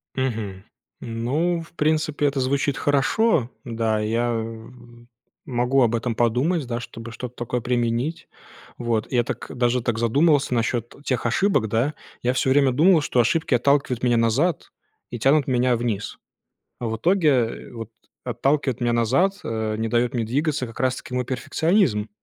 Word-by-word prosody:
Мгм. 110 -7 -3 0.4
Ну, 140 +10 -1
в 165 - -14
принципе, 155 -2 0
это 140 -1 +1
звучит 135 +1 0
хорошо. 145 - +2 0.2
Да, 115 -2 -1
я, 115 +3 0
э, 115 0 -5 0.8
могу 125 +2 +1
об 120 -1 +2
этом 115 0 -1
подумать, 130 +8 +1
да, 120 -1 -3
чтобы 115 -1 -9
что-то 125 +2 -7
такое 120 0 -3
применить. 120 +5 -1 0.5
Вот. 115 -2 -1
Я 120 -2 +2
так, - - -5
даже 125 0 +1
так 115 -1 -1
задумался 140 +4 +3
насчет 120 0 -1
тех 130 -5 -1
ошибок, 135 - +2
да. 115 +8 0 0.3
Я 125 +1 +2
всё 130 +1 +1
время 135 0 +4
думал, 160 +6 +4
что 135 -4 0
ошибки 155 +6 +2
отталкивают 130 -1 +2
меня 120 -1 +3
назад 130 +9 +1 0.4
и 120 - -5
тянут 140 +4 +3
меня 125 -1 +2
вниз. 115 -3 -3 0.6
А 120 - -4
в 110 - -2
итоге 150 - +1
вот 115 -2 -7 0.3
отталкивает 130 +1 0
меня 120 -1 +1
назад, 130 - +2
э, 110 -1 -2
не 110 +1 -1
дает 120 +1 +1
мне 120 -2 0
двигаться 145 +2 -1
как 115 - -11
раз 130 -1 +1
таки - - -9
мой 125 0 -1
перфекционизм. 135 - +1
125 Hz, 160 wpm, -23 LUFS, 115-140 Hz, 0.8 s, время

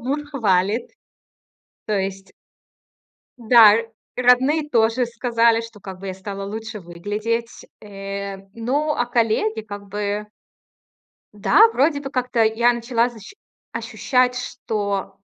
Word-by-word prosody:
муж 270 +5 -2
хвалит. 210 -4 +1 1.0
То 215 - -2
есть 195 0 -4 1.1
Да, 225 -3 +7
р 230 +1 -1 0.3
родные 260 +5 +3
тоже 230 0 +2
сказали, 235 -1 +2
что 230 -2 -11
как 190 -2 -9
бы 195 - -7
я 190 - -3
стала 195 +1 -7
лучше 220 +1 -6
выглядеть. 210 +7 -4 0.2
Э, 200 -1 -6 0.2
ну, 270 +7 -1
а 240 - 0
коллеги 225 -2 0
как 205 -1 -9
бы 205 +1 -3 1.1
Да, 400 - +5
вроде 285 - +2
бы 270 - -6
как-то 250 -3 0
я 225 +2 +3
начала 235 0 0
защ 225 - -13 0.4
ощущать, 250 -1 0
что 205 -6 -3
225 Hz, 120 wpm, -21 LUFS, 205-245 Hz, 1.1 s, Да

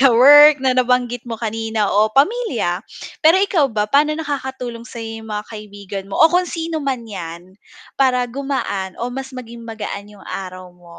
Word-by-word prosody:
kawork 280 +4 +8
na 265 -1 +1
nabanggit 250 -1 +1
mo 230 - -4
kanina 225 -1 -2
o 210 +2 +2
pamilya, 450 - +1 0.4
pero 325 +1 +6
ikaw 375 -7 +2
ba 215 -3 -1
paano 295 +7 +2
nakakatulong 265 -6 -5
sayo 225 -1 -7
yung 220 - -12
mga 210 0 -4
kaibigan 200 -2 -8
mo, 195 - -5
o 325 +1 +5
kung 360 0 +2
sino 325 -1 -3
man 265 -4 -3
yan 175 -4 -8 0.5
para 250 -2 +3
gumaan 245 -7 -4
o 245 +1 -4
mas 265 +1 -5
maging 235 -1 -9
magaan 205 -2 -6
yung - - -16
araw 185 -1 -7
mo? 175 -1 -16
240 Hz, 170 wpm, -19 LUFS, 210-275 Hz, 0.5 s, kawork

